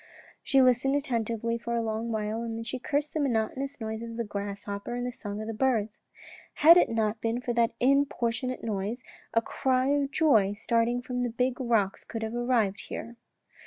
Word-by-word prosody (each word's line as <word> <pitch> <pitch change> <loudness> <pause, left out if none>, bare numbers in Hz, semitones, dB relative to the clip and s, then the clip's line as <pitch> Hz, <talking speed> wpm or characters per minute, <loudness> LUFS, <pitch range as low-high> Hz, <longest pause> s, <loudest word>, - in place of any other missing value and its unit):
She 270 -2 +4
listened 255 +2 +3
attentively 230 -4 -1
for 235 0 -3
a 230 - 0
long 225 +1 -2
time 220 +1 -2
and 230 -1 -4
then 230 - -4
she 245 +2 -4
cursed 290 +3 -1
the 315 - -1
monotonous 265 +1 -1
noise 220 0 -4
of 230 0 -7
the 235 - 0
grasshopper 200 +1 -5
and 245 0 -2
the 250 - -2
song 205 -3 -6
of - - -5
the 225 - -3
birds. 220 -3 0 0.3
" - - -19
Had 335 +2 +11
it 355 - +5
not 220 -1 0
been 230 +1 0
for 245 -1 -2
that 230 -1 +2
importunate 255 -2 +1
noise, 215 +3 -3 0.3
a 230 - +4
cry 260 +2 +1
of 285 -1 +1
joy 225 -11 +3
starting 230 +3 0
from 250 0 -3
the 245 - 0
big 250 +3 -1
rocks 220 -5 +1
could 225 -1 -5
have 220 +1 -3
arrived 240 -5 0
here." 235 +1 -6
235 Hz, 200 wpm, -28 LUFS, 220-255 Hz, 0.3 s, Had